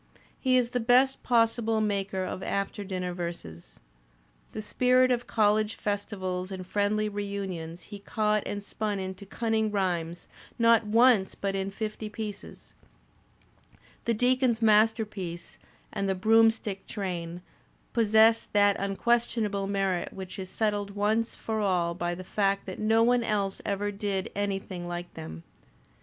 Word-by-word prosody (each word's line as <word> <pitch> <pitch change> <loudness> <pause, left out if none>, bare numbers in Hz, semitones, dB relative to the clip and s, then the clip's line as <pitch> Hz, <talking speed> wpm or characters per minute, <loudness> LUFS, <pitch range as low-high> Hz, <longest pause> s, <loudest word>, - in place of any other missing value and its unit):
He 255 -1 +3
is 245 -1 +1
the 245 - 0
best 255 +3 +3
possible 230 -2 +2
maker 200 -3 -1
of 185 - -5
after 200 +1 -2
dinner 185 -2 -3
verses. 85 - -7 0.7
The 215 - -5
spirit 255 +3 +3
of 245 -1 0
college 215 0 +2
festivals 190 -3 -3
and 190 -1 -6
friendly 205 +2 0
reunions 195 -5 -5
he 205 -1 -9
caught 210 +1 0
and 205 0 -4
spun 210 0 -3
into 190 +1 -6
cunning 220 +1 0
rhymes, 175 -4 -2 0.3
not 230 -2 +4
once 225 -3 +4
but 195 -1 -2
in 195 0 -1
fifty 215 +1 -5
pieces. 210 -1 -8 1.3
The 235 - +1
Deacon's 250 0 +2
Masterpiece" 215 -5 +1 0.3
and 195 0 -1
"The 190 - +1
Broomstick 220 0 +3
Train" 175 -4 -4 0.5
possess 225 0 +4
that 205 -1 +5
unquestionable 210 0 0
merit 195 -3 -1
which 190 0 -8
is 185 -1 -6
settled 205 -1 -1
once 215 +3 0
for 220 -1 -3
all 180 -4 +1
by 175 0 -2
the 185 - -8
fact 195 +1 0
that 185 - -7
no 225 +1 +3
one 245 0 +3
else 200 -3 -1
ever 205 0 -1
did 200 -2 -3
anything 195 -3 -3
like 175 0 -6
them. 80 +1 -8
205 Hz, 140 wpm, -28 LUFS, 190-220 Hz, 1.3 s, that